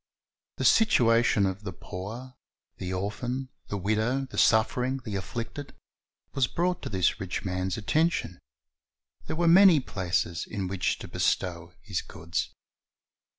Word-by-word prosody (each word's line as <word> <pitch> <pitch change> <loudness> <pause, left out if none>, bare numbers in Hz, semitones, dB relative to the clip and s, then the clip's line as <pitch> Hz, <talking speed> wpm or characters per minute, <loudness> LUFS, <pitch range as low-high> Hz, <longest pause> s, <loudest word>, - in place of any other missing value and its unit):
The - - -2
situation 115 - +4
of 95 +1 -2
the 100 -3 -5
poor, 110 +9 -8 0.4
the 90 - -4
orphan, 120 +8 -3 0.2
the 100 - -3
widow, 110 +7 0
the 130 - -10
suffering, 125 +4 +3
the 105 - -4
afflicted, 115 +8 -5 0.6
was 135 -3 +2
brought 180 +1 -1
to - - -5
this 95 -3 +1
rich 95 +1 -4
man's 90 +1 -2
attention; 115 - 0 0.9
there - - -2
were 170 +1 +1
many 180 -1 +8
places 90 - -2
in 100 -4 -3
which 95 -1 -1
to - - -8
bestow 85 -1 -1
liis 100 -4 -3
goods. 85 +2 -3
105 Hz, 135 wpm, -28 LUFS, 95-130 Hz, 0.9 s, many